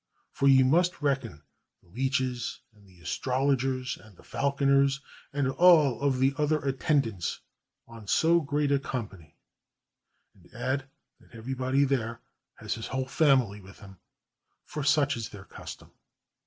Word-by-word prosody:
For 140 - +1
you 135 -1 +6
must 170 +3 +2
reckon 135 - -1 0.4
the 90 - -25
leeches 130 +2 -2
and 105 -2 -22
the 90 -2 -20
astrologers 130 +3 -1
and 105 -5 -18
the - - -18
falconers 140 0 +1 0.3
and 140 -1 0
all 140 -3 +4
the 135 +1 +2
other 150 +1 +2
attendants 135 - 0 0.5
on 115 -3 -12
so 165 +9 +4
great 145 0 0
a 140 - +3
com 125 -5 -4
pany; 85 -6 -17 1.0
and 90 -2 -23
add 130 +3 -2 0.3
that - - -20
everybody 130 +3 0
there 115 -4 -1 0.4
has - - -4
his 115 - -6
whole 130 0 -2
fam 135 -1 +4
ily 105 -3 -9
with 95 +1 -15
him, 95 -2 -13 0.7
for 150 - -5
such 145 0 +3
is 115 -2 -5
their 100 -3 -11
custom. - - -11
130 Hz, 145 wpm, -28 LUFS, 115-140 Hz, 1.0 s, you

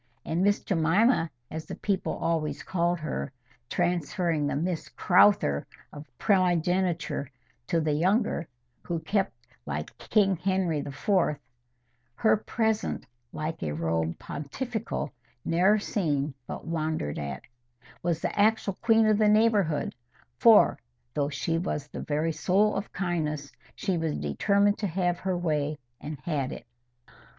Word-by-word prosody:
And 165 +2 0
Miss 205 +1 +3
Jemima, 170 +3 +3 0.2
as 160 0 -5
the - - -5
people 195 -2 -1
always 160 -2 -1
called 175 -1 0
her, 155 -3 -3 0.4
transferring 175 -2 0
the - - -1
MISS 165 +3 -2
CROWTHER 180 - +4 0.3
of 150 +1 -10
primogeniture 180 - +1 0.4
to 170 - +2
the 155 -2 +1
younger, 185 +2 +1 0.3
who 170 - -3
kept, 195 - 0 0.3
like 75 +1 -4
King 195 -4 +2
Henry 185 -4 0
IV.,— 150 +3 0 0.8
"Her 220 - +4
presence, 220 0 -1 0.3
like 155 +1 -4
a 75 -2 -2
robe 80 0 -1
pontifical, 220 - -4 0.3
Ne'er 185 +6 +4
seen 150 -9 -1
but - - -6
wonder'd 155 - -2
at," 70 -2 -5 0.6
was 170 -1 -1
the - - -2
actual 210 -2 +2
queen 225 -1 +5
of 215 -1 +3
the 215 -1 +5
neighbourhood; 210 -8 +3 0.5
for, 215 - +6 0.3
though 145 -1 0
she 165 +3 -1
was 150 -5 -2
the - - -7
very 155 +2 0
soul 195 +6 +2
of 195 +1 -4
kindness, 155 -6 -2 0.2
she 190 -5 -1
was 160 -2 -1
determined 200 - +2
to 205 - 0
have 175 0 0
her 190 0 -1
own 175 - -4
way, 150 -2 0 0.2
and 150 0 -6
had 145 -6 -2
it. - - -8
170 Hz, 135 wpm, -28 LUFS, 150-200 Hz, 0.8 s, for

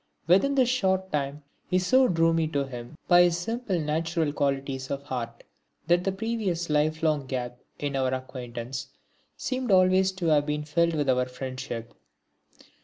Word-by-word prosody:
Within 195 - +4
this 260 -3 +4
short 190 -6 +1
time 145 0 -2 0.2
he 185 - +2
so 255 +8 +4
drew 165 -3 +3
me 165 -1 +1
to 140 -3 -1
him 125 +2 -9
by 175 -1 +7
his 175 -1 +3
simple 215 0 -2
natural 160 0 -1
qualities 135 -2 -1
of 140 0 -3
heart, 120 -4 -5 0.4
that 175 +2 +2
the 195 - +2
previous 195 -5 -2
life 155 +2 +1
long 150 -4 +1
gap 125 -2 -4 0.2
in 145 -1 -3
our 130 -1 +1
acquaintance 130 -1 -5 0.5
seemed 255 -1 -3
always 185 0 +4
to 190 -2 -5
have 145 -1 +3
been 150 0 -1
filled 170 +2 +1
with 145 -2 0
our 125 -1 +2
friendship. 130 -2 -6
155 Hz, 165 wpm, -27 LUFS, 135-185 Hz, 0.5 s, by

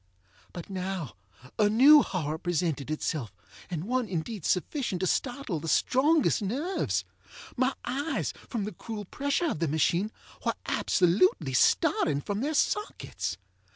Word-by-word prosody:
But 175 - -8
now 185 - -4 0.5
a 210 -1 +5
new 280 +7 +8
horror 160 - -3
presented 165 -6 -1
itself, 155 - -2 0.4
and 170 -3 -3
one 250 0 -1
indeed 180 +2 -4
sufficient 190 - -1
to - - +1
startle 245 - -1
the 165 - -7
strongest 285 - +3
nerves. 280 - -1 0.5
My 260 +1 +1
eyes, 275 +4 -2 0.2
from 230 -5 -2
the 210 - -4
cruel 215 -3 -7
pressure 285 - -1
of - - -4
the 165 - +1
machine, 170 +7 +1 0.3
were - - 0
absolutely 175 -6 +2
starting 140 +3 +3
from 205 +8 -3
their 300 +3 -1
sockets. 420 +7 -1
200 Hz, 135 wpm, -28 LUFS, 165-260 Hz, 0.5 s, new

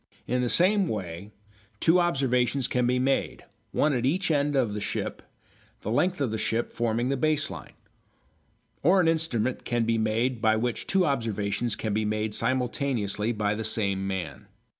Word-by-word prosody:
In 125 0 0
the 125 - 0
same 190 - +4
way 95 - -5 0.5
two 170 +2 +4
observations 135 -6 +1
can 125 -1 +1
be 125 +1 +2
made, 135 +2 0 0.3
one 150 0 +2
at 125 - 0
each 170 +7 +1
end 145 -1 +1
of 120 -6 +1
a - - -2
ship, 100 - -3 0.6
the - - -3
length 180 +10 +1
of 135 -6 0
the 110 - -2
ship 115 +2 -1
forming 120 +1 0
the 140 - +1
base 155 -3 +1
line. 80 -8 -9 1.1
Or 180 +6 +4
an 175 - +3
instrument 130 -7 0
can 120 -2 0
be 115 0 +1
made 115 +2 0
by 110 -1 +4
which 120 +2 -2
two 190 -2 +3
observations 115 - -1
can 110 -1 -3
be 110 +1 +1
made 105 0 -1
simultaneously 120 -3 -1
by 105 -2 0
the 110 +1 -3
same 100 -3 -1
man. 90 -8 -5
120 Hz, 175 wpm, -27 LUFS, 110-140 Hz, 1.1 s, same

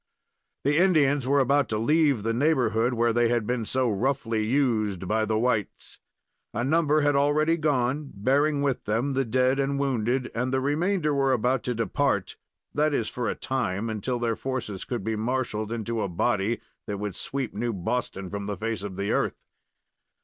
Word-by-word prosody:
The 145 +3 +3
Indians 145 -8 +3
were 140 +1 +3
about 140 +2 +2
to 110 - -1
leave 145 -1 +2
the 115 +1 0
neighborhood 125 -4 +2
where 115 0 +2
they 120 0 +3
had 120 -2 +1
been 120 0 -1
so 130 -1 +1
roughly 115 0 0
used 110 -7 0
by 110 +2 +1
the 110 0 0
whites. 110 -3 -2 0.6
A 120 - 0
number 155 +2 +3
had 145 0 +2
already 150 +3 +3
gone, 145 -2 0
bearing 140 +7 +2
with 135 -3 -1
them 115 +7 0
the 135 0 +1
dead 130 +3 +2
and 140 0 0
wounded, 130 -2 0
and 125 +3 -1
the 130 - +1
remainder 155 +3 +1
were 135 -1 +2
about 125 +1 +1
to 125 - -1
depart 115 -1 0 0.4
that 150 0 +2
is, 115 - -1
for 125 -2 -2
a - - -2
time, 115 -4 -2
until 110 +4 -2
their 120 -1 0
forces 125 -8 -4
could 120 -5 -4
be 110 +2 -1
marshaled 110 -2 -2
into 115 0 -2
a 100 - -1
body 105 +4 0 0.3
that 105 -2 -3
would 100 -2 -4
sweep 135 +2 -3
New 120 +3 -2
Boston 100 -1 -3
from 100 0 -4
the 105 -2 -3
face 110 0 -3
of 100 -2 -6
the 100 +1 -1
earth. - - 0
125 Hz, 185 wpm, -26 LUFS, 110-140 Hz, 0.6 s, The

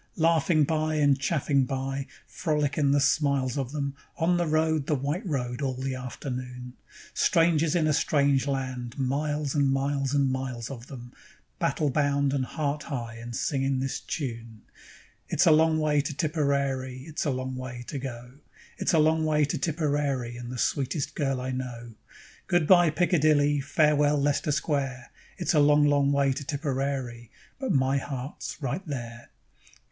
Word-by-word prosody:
Laughing 165 -1 +3
by 155 +1 0
and 145 -2 +3
chaffing 140 -2 +1
by, 135 +1 -3 0.2
frolic 150 -4 -1
in 145 -3 +2
the 140 +1 +4
smiles 140 -3 +1
of 135 -3 -3
them, 140 -2 -3 0.2
On 175 +1 +2
the 175 -1 0
road, 155 -2 +1
the 150 - +2
white 145 - -2
road, 125 -4 -2
all 135 -2 -1
the 130 +1 -3
afternoon; 125 -1 -6 0.4
Strangers 165 -1 +3
in 165 -3 +2
a 155 - +2
strange 140 -2 +2
land, 130 -3 -3
miles 145 +2 -1
and 140 -2 +2
miles 140 0 0
and 140 -2 +2
miles 130 -2 -4
of 125 -2 -9
them, 120 -4 -10 0.5
Battle 150 -3 0
bound 140 0 +1
and 135 -2 0
heart 145 +1 -2
high, 120 -7 -5
and 120 +1 -7
singing 135 0 0
this 135 0 -2
tune: 115 -6 -6 0.7
_It's 175 - +3
a 165 - +6
long 160 +1 +4
way 150 -1 +2
to 140 0 -5
Tipperary, 140 -4 -1
It's 155 0 -3
a - - +1
long 130 0 -3
way 125 -1 -6
to 140 - -5
go; 125 -2 -7 0.5
It's - - +1
a - - +5
long 160 +1 +3
way 150 -1 +2
to 155 +4 -2
Tipperary, 145 -5 -1
And 120 0 -7
the 125 - -5
sweetest 135 +3 -1
girl 135 -3 -1
I 130 +1 -3
know. 120 -2 -6 0.5
Good 175 -2 +2
bye, 175 0 +6
Piccadilly, 155 -4 +3
Farewell, 150 0 +3
Lester 145 +1 +1
Square: 140 -4 -2 0.3
It's 175 - 0
a 155 - +4
long, 145 0 +5
long 140 -1 +3
way 140 -1 +2
to 145 - -5
Tipperary, 135 -4 -3 0.3
But 265 -2 -1
my 135 0 +2
heart's 135 0 -6
right 140 +7 -2
there. 120 -4 -6
140 Hz, 165 wpm, -27 LUFS, 130-150 Hz, 0.7 s, a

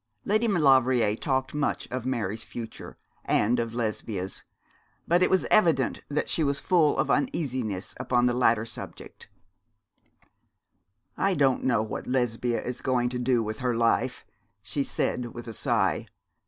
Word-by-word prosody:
Lady 215 +3 +2
Maulevrier 130 - +4
talked 130 +2 -1
much 150 0 -1
of 125 0 -3
Mary's 110 -4 -2
future, 115 -1 -8 0.3
and 115 +4 +2
of 115 0 -3
Lesbia's; 110 -4 -3 0.7
but 175 +2 +3
it 185 - +4
was 190 - +2
evident 165 -11 +3
that 145 - -1
she 160 - +1
was 140 -1 0
full 160 -3 +3
of - - +1
uneasiness 130 - -1
upon 125 -1 +2
the 125 - +2
latter 115 -3 +2
subject. - - -9 1.9
'I 195 -1 +1
don't 135 -4 +2
know 115 -4 +2
what 110 - -6
Lesbia 120 -2 0
is 125 - -5
going 125 -2 +1
to 125 0 -4
do 125 -2 +2
with 110 0 -5
her 125 -2 0
life,' 120 +2 +1 0.4
she 140 +8 -1
said, 120 -3 -2
with 120 0 -8
a 115 - -6
sigh. 110 -3 0
125 Hz, 150 wpm, -27 LUFS, 115-140 Hz, 1.9 s, Maulevrier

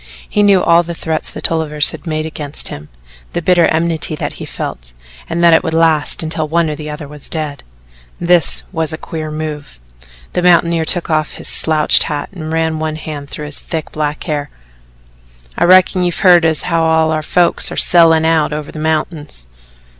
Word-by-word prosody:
He 210 - 0
knew 200 -3 +4
all 170 0 +4
the 170 0 -7
threats 160 -1 -3
the - - -8
Tolliver 160 -2 -1
had 150 - +1
made 155 -1 -2
against 150 -2 -4
him, 75 +1 -9 0.4
the - - -1
bitter 175 -1 +4
enmity 160 -1 0
that - - -5
he - - -5
felt, - - -7 0.4
and 170 +1 -2
that 170 -1 +6
it 160 - +4
would 160 -2 -2
last 160 -2 +2
until 160 0 -3
one 165 0 0
or - - -4
the 150 0 -8
other 150 0 -7
was 150 0 -11
dead. 150 -4 -3 0.6
This 175 -3 +4
was 160 -4 -1
a 160 - -3
queer 155 -1 -6
move. 150 - -7 0.5
The - - -1
mountaineer 170 -2 +3
took 170 0 +2
off 155 -1 0
his - - -6
slouched 155 -1 +3
hat 145 -1 -2
and 160 -4 -7
ran 160 -1 -1
one 155 0 -3
hand 150 -2 -8
through 150 - -6
his 150 0 +2
thick 160 -2 -5
black 150 0 -3
hair. 145 -3 -3 1.1
"I - - +1
reckon 185 0 +4
you've 175 -1 -2
heard 175 -2 +6
as 160 -2 +1
how 165 -2 0
all 160 0 +2
our 155 -1 -1
folks 175 +3 +2
air - - -7
sellin' 165 -2 +5
out 160 -2 +1
over 150 0 -6
the 155 - -9
mountains." 155 - -3
160 Hz, 195 wpm, -15 LUFS, 150-170 Hz, 1.1 s, that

